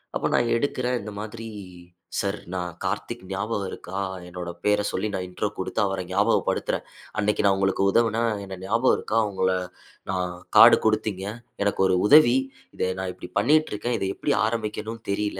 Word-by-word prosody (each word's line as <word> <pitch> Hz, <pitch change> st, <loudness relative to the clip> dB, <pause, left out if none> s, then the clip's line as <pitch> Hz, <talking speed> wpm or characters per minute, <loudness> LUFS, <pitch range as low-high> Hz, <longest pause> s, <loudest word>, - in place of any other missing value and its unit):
அப்போ -, -, 0 dB
நான் 120 Hz, -1 st, +2 dB
எடுக்கறேன் 125 Hz, -1 st, -1 dB
இந்த 105 Hz, +1 st, -7 dB
மாதிரி 115 Hz, +2 st, -6 dB, 0.7 s
"சார் 100 Hz, +1 st, -1 dB, 0.2 s
நான் 90 Hz, -2 st, -3 dB
கார்த்திக் 105 Hz, +4 st, -3 dB
ஞாபகம் 100 Hz, 0 st, -2 dB
இருக்கா? 95 Hz, +2 st, -7 dB, 0.3 s
என்னோட 90 Hz, -1 st, -6 dB, 0.2 s
பேர 105 Hz, 0 st, +3 dB
சொல்லி 95 Hz, +3 st, -1 dB
நான் 90 Hz, -, -2 dB
இன்ட்ரோ 90 Hz, +3 st, -2 dB
குடுத்து 95 Hz, +3 st, -1 dB
அவர 95 Hz, -1 st, -2 dB
ஞாபகப்படுத்துறேன். -, -, +1 dB, 0.3 s
அன்னைக்கு 105 Hz, 0 st, +1 dB
நான் 100 Hz, -1 st, +5 dB
உங்களுக்கு 95 Hz, 0 st, +1 dB
உதவுனேன், 115 Hz, +1 st, +2 dB, 0.2 s
எனக்கு 95 Hz, -1 st, -8 dB
ஞாபகம் 115 Hz, +5 st, +3 dB
இருக்கா? 110 Hz, -, -2 dB
உங்கள 95 Hz, -1 st, 0 dB, 0.6 s
நான் 90 Hz, -1 st, -1 dB, 0.3 s
கார்ட் -, -, +10 dB
கொடுத்தீங்க. 110 Hz, -3 st, 0 dB, 0.4 s
எனக்கு 100 Hz, -1 st, 0 dB
ஒரு 95 Hz, -, +3 dB
உதவி. 145 Hz, -2 st, +7 dB, 0.4 s
இதை -, -, 0 dB
நான் 95 Hz, -1 st, -2 dB
இப்படி 90 Hz, -, -10 dB
பண்ணிட்டு 155 Hz, +8 st, +3 dB
இருக்கேன். 120 Hz, +3 st, -1 dB
இதை 95 Hz, -, -1 dB
எப்படி -, -, 0 dB
ஆரம்பிக்கணும்னு 110 Hz, 0 st, -3 dB
தெரில. 105 Hz, -1 st, -1 dB
105 Hz, 160 wpm, -25 LUFS, 95-115 Hz, 0.7 s, கார்ட்